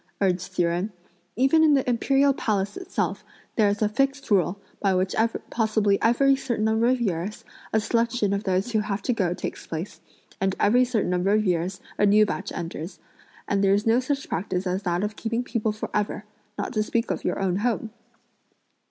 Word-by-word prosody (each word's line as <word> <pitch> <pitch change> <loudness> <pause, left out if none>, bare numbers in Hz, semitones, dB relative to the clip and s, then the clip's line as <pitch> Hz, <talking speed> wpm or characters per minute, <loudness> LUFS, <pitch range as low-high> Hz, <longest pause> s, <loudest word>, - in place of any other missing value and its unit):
urged 185 -1 0
Hsi 175 - +2
Jen; 175 +5 -1 0.4
"even 270 +6 +4
in 300 -2 +6
the 270 - 0
imperial 270 +3 +3
palace 205 - -1
itself, 380 0 -3 0.3
there's 210 -1 +2
a - - +4
fixed 275 +4 -1
rule, 195 0 +2 0.2
by 195 -2 +2
which 185 +1 0 0.4
possibly 215 -3 +1
every 275 +4 +4
certain 240 -5 -2
number 220 +1 +2
of 255 0 +2
years 195 -2 -2 0.3
a 220 - +3
selection 230 -1 +1
(of 200 +1 -1
those 190 +4 0
who 220 - +2
have 210 -1 -3
to 250 - +1
go 180 -6 0
takes - - -6
place), 165 +4 -6 0.4
and 195 0 +1
every 245 +5 +4
certain 230 -7 0
number 180 +2 +1
of 215 +1 +3
years 180 +1 -1 0.2
a 205 - +5
new 210 +1 +6
batch 195 -1 -4
enters; 165 +1 -6 0.5
and 200 0 +1
there's 200 +2 +3
no 230 +2 +4
such 275 +2 -2
practice 180 +1 -2
as 185 +1 -1
that 175 -1 -1
of 210 0 -2
keeping 230 +2 -2
people 225 -3 -1
for 215 - -6
ever; 210 0 -1 0.3
not 205 - -3
to 215 - +1
speak 230 +2 -1
of - - -3
your - - -1
own 190 -2 0
home." 225 0 -1
210 Hz, 190 wpm, -25 LUFS, 190-235 Hz, 0.5 s, in